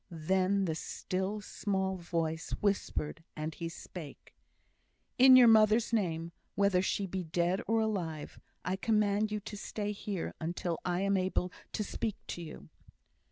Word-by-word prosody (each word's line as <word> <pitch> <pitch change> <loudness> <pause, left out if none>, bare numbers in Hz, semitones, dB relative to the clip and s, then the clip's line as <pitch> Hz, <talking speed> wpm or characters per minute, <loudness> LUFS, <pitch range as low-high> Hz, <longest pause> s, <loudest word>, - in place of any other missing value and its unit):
Then 185 +4 +1
the 165 - 0
still 190 +5 -3
small 190 -2 -1
voice 165 -2 -2
whispered, 190 -5 -1
and 155 +1 -3
he 165 +1 -4
spake: 165 -2 -10 0.9
"In 260 0 +10
your 250 -2 +9
mother's 220 +1 +5
name, 170 -6 0 0.2
whether 200 -2 +3
she 195 +1 0
be 190 0 -3
dead 175 +3 +1
or 225 +1 +3
alive, 175 -9 -3 0.3
I 185 +2 0
command 210 0 +2
you 210 - -1
to 210 0 -7
stay 205 0 -3
here 200 -3 -4
until 170 +1 -2
I 180 +1 0
am 200 0 +2
able 185 -1 0 0.2
to 215 - -1
speak 215 +1 -3
to 175 - -4
you." 160 -2 -9
190 Hz, 150 wpm, -32 LUFS, 170-210 Hz, 0.9 s, In